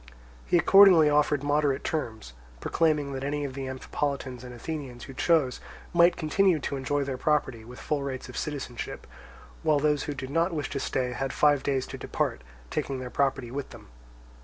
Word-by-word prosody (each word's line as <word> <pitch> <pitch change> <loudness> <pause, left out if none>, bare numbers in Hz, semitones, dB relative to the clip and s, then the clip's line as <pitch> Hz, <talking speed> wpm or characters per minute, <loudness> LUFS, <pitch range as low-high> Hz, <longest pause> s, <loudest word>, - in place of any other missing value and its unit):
He 175 - +4
accordingly 180 -5 +7
offered 145 -1 +2
moderate 145 -1 +1
terms, 110 - -4 0.3
proclaiming 150 - +1
that 135 0 -4
any 145 +1 -2
of 135 - -5
the 135 0 -5
Amphipolitans 130 -1 -4
and 125 - -8
Athenians 125 -1 -6
who 135 - -9
chose, 145 -3 +1 0.3
might 170 +1 +5
continue 175 +2 +2
to 140 - -3
enjoy 140 +2 -1
their 135 -2 -4
property 140 -7 0
with 120 +2 -11
full 150 -2 -2
rights 135 -2 -5
of 125 - -10
citizenship; 135 -5 -5 0.6
while 155 -1 +3
those 150 0 +1
who 145 -1 -4
did 135 0 -6
not 165 +3 +1
wish 150 - -3
to 140 - -2
stay 130 -2 -1
had 135 +2 -3
five 145 -2 +3
days 135 -1 0
to - - -8
depart, 60 - -2 0.3
taking 135 - -2
their 125 -1 -6
property 135 -3 0
with 140 +1 -5
them. - - -13
140 Hz, 185 wpm, -27 LUFS, 130-150 Hz, 0.6 s, accordingly